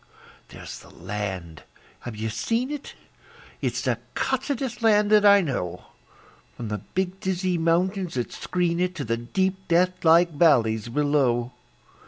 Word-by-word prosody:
There's - - -9
the - - -16
land. 95 -4 -5 0.4
(Have 120 -3 -7
you 110 +1 -3
seen 230 - -1
it?) 295 -2 -7 0.7
It's - - -1
the - - 0 0.2
cussedest 265 -2 -2
land 210 -2 +4
that 210 -1 +6
I 200 0 +7
know, 90 - -3 0.7
From 115 -3 -5
the 105 -1 -3
big, 185 - -3
dizzy 185 -1 -1
mountains 175 +2 0
that 120 -2 -3
screen 175 -1 -1
it 180 0 0
To 150 - -4
the 115 -1 -1
deep, 190 +10 -2
deathlike 175 -1 +4
valleys 120 -8 +3
below. 130 -3 +1
170 Hz, 140 wpm, -25 LUFS, 120-190 Hz, 0.7 s, I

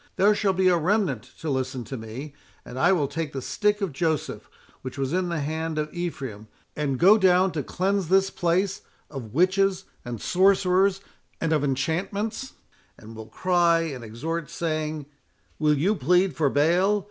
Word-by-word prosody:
There 205 +2 +4
shall 205 -2 +1
be 190 0 +2
a 180 -1 +4
remnant 180 - +1 0.2
to 160 - -3
listen 130 -1 -2
to 135 - -7
me; 125 +6 -8 0.3
and 125 +1 -7
I 175 +6 +4
will 160 -7 +2
take 150 +1 -4
the 135 - -3
stick 210 - 0
of 190 -7 -2
Joseph, 160 +1 -2 0.3
which 130 +1 -7
was 135 +2 -2
in 180 -1 0
the 170 -3 -2
hand 160 +2 -3
of 150 0 -3
Ephraim, 135 -11 -5 0.3
and 140 -3 -1
go 200 +8 +6
down 185 0 +4
to 155 - -2
cleanse 190 +5 -1
this 195 +2 +3
place 185 +3 0 0.3
of 125 -5 -8
witches 190 +2 +2 0.2
and 120 -3 -6
sorcerers, 190 - +3 0.4
and 165 -1 0
of 150 -2 +1
enchantments, 195 - -2 0.4
and 110 +1 -12
will 110 0 -9
cry 170 +5 +2
and 140 -7 -5
exhort, 150 +9 -4
saying—Will 150 - -3
you 185 +9 +2
plead 180 0 +2
for 145 -2 +2
Baal? 175 +9 +3
165 Hz, 170 wpm, -25 LUFS, 140-190 Hz, 0.4 s, go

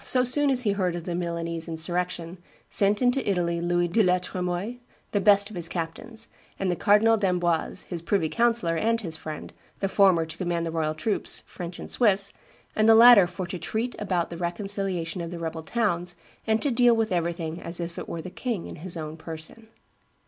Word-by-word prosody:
so 255 -1 +4
soon 285 +3 +3
as 255 -2 +2
he 210 - +2
heard 185 -3 0
of 175 - -5
the 175 - -4
Milanese 170 -1 -3
insurrection, 175 +1 -3 0.3
sent 205 +4 +2
into 250 -1 +2
Italy 170 -3 0
Louis 175 0 +1
de 185 +7 +2
la 180 -2 +4
Tremoille, 180 +5 -3 0.3
the 205 - +1
best 200 0 +4
of - - -9
his 170 -1 -1
captains, 205 +7 -5 0.3
and 190 -2 0
the - - 0
Cardinal 220 +4 +4
d'Amboise, 180 -3 0
his 175 -3 -6
privy 170 -1 +1
councillor 230 -4 +2
and 230 +6 +1
his 165 -6 -4
friend, 155 -1 -7 0.3
the 195 - 0
former 190 -4 +4
to 160 0 -9
command 175 -2 -1
the 165 - -3
royal 155 -1 -1
troops, 205 +6 0
French 175 -1 -8
and - - -8
Swiss, 200 -4 +2 0.4
and 215 +1 +4
the 225 - +8
latter 230 -5 +9
"for 180 +1 -5
to 180 0 -6
treat 230 +6 -3
about 180 -5 -1
the 170 - -6
reconciliation 180 -1 -1
of 170 - -5
the 175 - -6
rebel 165 -1 -4
towns, 175 -3 -1 0.3
and 220 0 +2
to 285 - +1
deal 240 -1 +5
with 225 -2 0
everything 170 -1 -2
as 170 +1 -5
if 170 0 -5
it - - -7
were 165 -1 -5
the 185 - -7
king 230 -6 -3
in - - -8
his 170 +2 -6
own 155 0 -6
person." 160 +7 -9
180 Hz, 205 wpm, -26 LUFS, 170-215 Hz, 0.4 s, latter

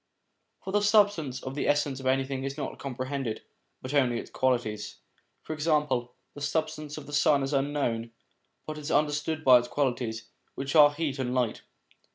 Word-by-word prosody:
For 190 - -5
the 205 - +3
substance 205 - +3
of 130 - -5
the 145 - -2
essence 145 -2 +1
of 130 - -4
anything 135 0 0
is 135 +1 -4
not 150 - -5
comprehended, 130 -2 -4 0.4
but 130 +2 -5
only 130 -4 +3
its - - -7
qualities. 110 -5 -1 0.5
For - - -5
example, 150 -6 0 0.2
the 145 - -10
substance 155 0 -2
of 150 - -8
the 145 - -10
sun 145 -1 +4
is 135 +2 -2
unknown, 135 -5 0 0.6
but 155 0 -6
is 150 0 -6
under 150 0 +3
stood 155 +1 -2
by 130 -2 +9
its 120 - -5
qualities, 120 -5 -1 0.3
which 135 +2 -4
are 145 -2 +8
heat 145 -2 -3
and 125 -1 -1
light. 125 -4 0
140 Hz, 180 wpm, -28 LUFS, 130-150 Hz, 0.6 s, by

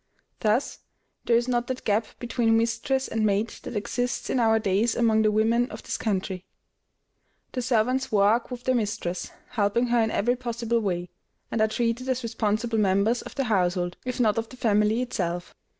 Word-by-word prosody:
Thus 220 +4 0 0.5
there 235 - +3
is 240 +1 0
not 240 -1 0
that 260 0 -4
gap 215 +1 +1
between 235 -2 +1
mistress 230 +4 0
and 225 -1 -1
maid 210 +1 +2
that - - -7
exists 245 +4 -2
in 260 - +1
our 225 -1 +4
days 215 +2 +1
among 225 -2 +3
the 215 -1 +3
women 230 +3 +2
of - - -9
this - - -3
country. 190 -3 -2 1.1
The 255 - -2
servants 255 +2 +1
work 210 +3 +3
with 250 -1 -7
their 255 - +2
mistress, 205 -6 -2 0.2
helping 235 +1 +1
her 240 -1 +3
in 220 - +1
every 240 +3 +1
possible 235 -1 -1
way, 180 -4 -2 0.4
and 225 - 0
are 220 - +5
treated 235 +3 -1
as 255 -1 0
responsible 225 0 0
members 200 +4 +2
of - - -10
the 275 - 0
household, 180 -5 0
if 250 0 -4
not 220 -2 +3
of 225 - -5
the 255 - -12
family 215 +1 +2
itself. 175 -7 -3
225 Hz, 180 wpm, -26 LUFS, 210-240 Hz, 1.1 s, are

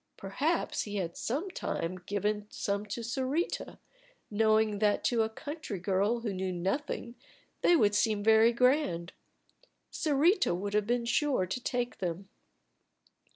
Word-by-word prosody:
Perhaps 280 - -1
he 205 -1 -6
had 180 -4 -2
at - - -16
some 310 - -2
time 185 - -3
given 210 +1 -1
some 200 +1 -2
to 210 +3 -4
Sarita, 265 +8 -2 0.5
knowing 215 -1 +3
that 210 -1 +2
to 235 -2 +2
a 220 - +1
country 290 - -6
girl 200 +6 0
who 220 -4 -2
knew 185 0 -2
nothing 215 - -3 0.5
they 350 - +5
would 210 -9 +4
seem 210 0 +1
very 220 +1 +6
grand. 240 - +1 0.8
Sarita 310 - +2
would 200 +3 -4
have 210 -1 +1
been 240 0 0
sure 260 -4 +1
to 190 +8 -4
take 245 -1 -2
them. 185 +1 -4
220 Hz, 145 wpm, -30 LUFS, 200-250 Hz, 0.8 s, very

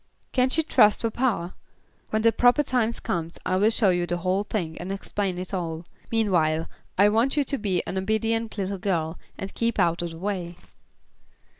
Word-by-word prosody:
Can't 255 +2 +2
you 320 - +3
trust 210 -9 +4
papa? 225 -6 0 0.6
When 215 0 0
the 230 - +6
proper 245 +5 +4
time 245 -4 +1
comes 170 -7 -3
I'll 190 +4 +3
show 220 -4 +3
you 175 -1 0
the 175 - -1
whole 185 +3 0
thing, 175 -7 -3
and 190 - -5
explain 195 -1 -2
it 180 +2 -6
all. 165 -2 -3 0.3
Meantime 170 -8 +2 0.3
I 200 +2 +6
want 230 +7 +2
you 290 - +4
to 275 +1 -2
be 190 -4 0
an 190 - -2
obedient 220 +3 -1
little 195 0 -2
girl, 170 -4 -1 0.2
and 195 0 -6
keep 230 0 -1
out 170 -3 +2
of 175 - -3
the 165 - -9
way." 180 -2 -3
195 Hz, 180 wpm, -25 LUFS, 175-225 Hz, 0.6 s, the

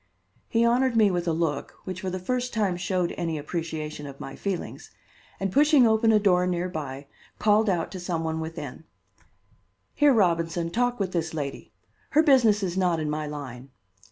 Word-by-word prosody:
He 230 0 +3
honored 245 +1 +2
me 210 -3 +5
with 175 -1 -2
a - - +3
look, 160 -3 -2
which 185 -1 -6
for 190 - -2
the 185 - -3
first 250 +7 -2
time 200 -5 +1
showed 180 -1 -1
any 165 -2 -2
appreciation 155 -1 -5
of 140 -1 -10
my 135 - -7
feelings, 195 -3 -5 0.5
and 195 -1 -1
pushing 290 - +5
open 225 0 +4
a 215 - +5
door 180 -3 +3
near 180 0 -1
by, 140 -4 -6 0.3
called 215 0 +3
out 175 -3 -1
to 185 - -6
some 175 -2 -2
one 160 0 -2
within: 160 -2 -7 1.1
"Here, 295 -1 +4
Robinson, 170 -6 +1
talk 245 +2 0
with 190 -2 -1
this 165 -2 -2
lady. 140 -3 -5 0.5
Her 310 - +7
business 235 -8 +4
is 180 -2 -2
not 180 -3 +1
in 150 -1 -2
my 155 0 -3
line." 135 -3 -7
180 Hz, 185 wpm, -26 LUFS, 160-215 Hz, 1.1 s, Her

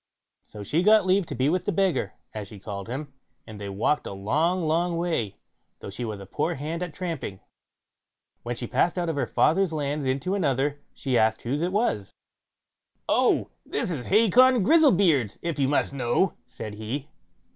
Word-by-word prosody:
So 105 -1 -10
she 150 - +1
got 210 +1 +5
leave 190 -1 +2
to - - -5
be 130 +3 +1
with 180 +4 0
the - - +1
beggar, 185 - 0 0.2
as 105 -2 -5
she 105 - -11
called 100 0 -6
him, 135 +2 -5 0.3
and 105 -2 -10
they 100 - -5
walked 105 +10 0
a - - -5
long, 155 - 0
long 170 +2 +1
way, 165 - -1 0.4
though - - -8
she 120 - -5
was 110 -3 -4
but 100 - -9
a 95 - -16
poor 165 +3 -1
hand 155 +5 -4
at 180 -2 -3
tramping. 155 - -5 1.0
When 120 +1 -4
she 120 - -4
passed 135 +9 +1
out 175 -2 0
of 160 - -1
her 140 - -1
father's 185 +2 +2
land 145 -2 -2
into 135 +8 -1
another, 145 -5 0 0.2
she 130 -3 0
asked 110 0 +2
whose 140 +6 -1
it 175 +2 0
was? 195 - -1 0.9
"Oh! - - +2
this - - -2
is 135 -7 -4
Hacon 230 +3 +5
Grizzlebeard's, 185 - +4
if 170 -3 -2
you 135 - +3
must 140 0 +1
know", 135 +7 +1
said 110 -1 -7
he. 120 +8 -5
145 Hz, 190 wpm, -26 LUFS, 115-175 Hz, 1.0 s, got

